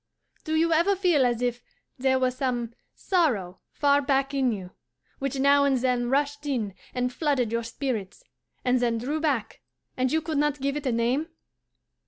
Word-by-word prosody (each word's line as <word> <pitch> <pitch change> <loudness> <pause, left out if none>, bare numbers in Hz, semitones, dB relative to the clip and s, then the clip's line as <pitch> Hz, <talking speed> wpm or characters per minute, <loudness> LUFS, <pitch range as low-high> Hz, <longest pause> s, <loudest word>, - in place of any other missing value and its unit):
Do 315 -1 -2
you 330 +1 +3
ever 340 +5 +3
feel 350 -9 +3
as 240 0 -1
if 245 0 -1 0.4
there 260 0 +3
were 255 -1 +2
some 245 -3 -2 0.2
sorrow 225 - 0
far 285 0 +3
back 275 0 +1
in 265 -3 +2
you, 190 -4 -6 0.5
which 275 0 -2
now 280 +1 +5
and 275 -2 +3
then 245 -1 0
rushed 290 +2 0
in 225 -8 -1 0.2
and 250 0 -1
flooded 275 -7 0
your 230 0 0
spirits, 230 - -4 0.4
and 250 0 +3
then 235 -1 +1
drew 280 +7 -2
back, 285 -8 -1 0.3
and 255 0 0
you 320 - +3
could 310 -2 -2
not 295 -1 +1
give 275 +1 -1
it 295 -2 -3
a - - +2
name? 240 +7 0
265 Hz, 180 wpm, -26 LUFS, 245-290 Hz, 0.5 s, now